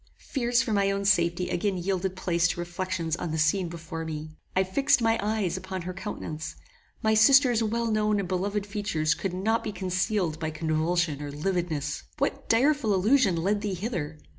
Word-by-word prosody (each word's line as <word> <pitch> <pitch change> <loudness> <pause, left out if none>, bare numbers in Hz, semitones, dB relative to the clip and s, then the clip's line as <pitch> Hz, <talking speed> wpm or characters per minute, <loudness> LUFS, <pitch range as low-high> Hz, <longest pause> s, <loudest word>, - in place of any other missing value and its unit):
Fears 245 -1 +2
for 235 -5 -2
my 200 -1 +2
own 200 0 -1
safety 175 -2 +2
again 190 +1 0
yielded 190 +1 -1
place 170 -2 +1
to 175 - -3
reflections 175 -1 -2
on 175 - -4
the 160 - -2
scene 165 +3 +2
before 165 -1 -6
me. 155 -1 -5 0.2
I 190 - +4
fixed 275 +8 +2
my 225 -1 +2
eyes 205 -4 0
upon 185 -1 -5
her 185 +1 -5
countenance. 170 -5 -6 0.5
My 220 0 +3
sister's 245 +2 +6
well 230 +1 0
known 215 -1 +2
and 195 - -2
beloved 195 +3 -1
features 200 -7 0
could 190 -2 -4
not 220 +5 0
be 215 - -3
concealed 185 -3 -1
by 155 -2 -2
convulsion 160 0 0
or 145 - -5
lividness. 155 -1 -2 0.2
What 275 0 -2
direful 250 -2 +3
illusion 210 0 +3
led 205 +2 +1
thee 205 -3 -2
hither? 175 -6 -4
190 Hz, 180 wpm, -27 LUFS, 170-215 Hz, 0.5 s, sister's